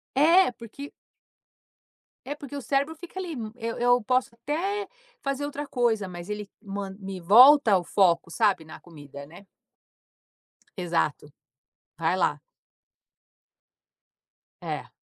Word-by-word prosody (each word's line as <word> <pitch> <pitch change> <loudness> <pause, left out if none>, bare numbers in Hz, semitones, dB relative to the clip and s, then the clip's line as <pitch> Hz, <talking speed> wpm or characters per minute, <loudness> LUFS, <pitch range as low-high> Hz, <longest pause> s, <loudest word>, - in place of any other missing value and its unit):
É, 335 +6 +5
porque 235 +5 -10 1.4
É, 285 - -3
porque 285 -1 -10
o - - -4
cérebro 280 +4 0
fica 350 +3 -10
ali, 360 -4 -4
hum, 225 -5 -6
eu 230 -1 -4
eu 245 0 +3
posso 255 0 0
até 360 - -3 0.4
fazer 275 +1 -2
outra 290 0 -5
coisa, 230 -7 0
mas 175 +1 -9
ele 210 -1 -5
man 195 -1 -6
me 190 -1 -6
volta 245 - +7
ao 185 -2 +4
foco, 170 -2 +2
sabe, 200 -2 +1
na 160 - -11
comida, 145 -4 -12
né. 175 +6 -15 1.3
Exato, 165 -4 -2 0.7
vai 165 +2 +1
lá. 150 -5 0 2.2
É. - - -5
225 Hz, 125 wpm, -26 LUFS, 185-280 Hz, 2.2 s, volta